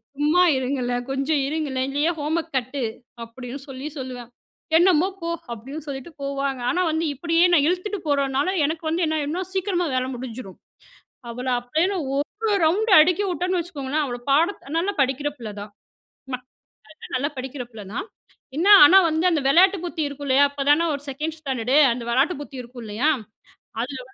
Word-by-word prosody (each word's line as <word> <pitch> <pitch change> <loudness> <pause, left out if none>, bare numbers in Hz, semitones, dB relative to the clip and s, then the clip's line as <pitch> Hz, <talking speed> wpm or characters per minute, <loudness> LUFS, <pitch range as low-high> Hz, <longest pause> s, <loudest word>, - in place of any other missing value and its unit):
சும்மா 300 +5 +3 0.2
இருங்களேன் 250 -2 -2
கொஞ்சம் 275 +2 0
இருங்களேன். 275 -4 -2
இல்லையே 290 +4 +1
ஹோம்வொர்க் 320 +1 -2
கட்டு, 260 +2 -2 0.4
அப்டின்னு 250 +3 -8
சொல்லி 270 +2 -6
சொல்லுவேன். 250 -2 -7 0.5
என்னமோ 350 0 +4
போ, 335 - -4 0.3
அப்டின்னு 270 +7 -8
சொல்லிட்டு 270 +3 -6
போவாங்க. 275 -2 -2
ஆனா, 365 - +1
வந்து 320 +1 -1
இப்டியே 335 +4 +2
நான் 295 -3 +5
இழுத்துட்டு 370 +4 -1
போறனால 280 +4 +1
எனக்கு 320 +2 -3
வந்து 335 +2 0
என்ன 315 0 -1
ஆயிடும்னா 310 +6 -2
சீக்கிரமா 375 -2 0
வேல 255 - +1
முடிஞ்சிரும். 240 -5 -8 0.7
அவள 250 +2 -5
அப்டியேன்னு 320 +11 0 0.2
1 285 +1 0 0.4
ரவுண்ட் 400 +8 +2
அடிக்க 360 +5 +3
வுட்டேன்னு 360 +1 -1
வச்சுக்கோங்களேன். 300 -3 -3
அவள 245 -3 -4
பாட 330 +8 +3 0.2
நல்லா 380 +5 0
படிக்கிற 275 +2 +1
பிள்ள 230 -5 -7
தான். 205 0 -9 1.4
நல்லா 280 +4 0
படிக்கிற 260 0 -5
பிள்ள 220 -2 -9
தான். 370 - -3 0.5
என்ன 345 +5 +1 0.2
ஆனா, 370 +1 +7
வந்து 315 +3 0
அந்த 310 - +1
வெளாட்டு 370 +7 +5
புத்தி 335 -2 -3
இருக்கும் 285 0 -7
இல்லையா? 275 +2 +5
அப்பதானே 290 +4 +2
ஒரு 280 - -9
செகண்ட் 305 +4 -4
ஸ்டாண்டர்ட் 260 -4 -1 0.2
அந்த 240 - -6
வெளாட்டு 275 +9 +2
புத்தி 280 -2 -9
இருக்கும். 245 0 -11
இல்லையா? 220 +9 0 0.7
அதில 260 +1 -5
285 Hz, 155 wpm, -23 LUFS, 260-330 Hz, 1.4 s, ஆனா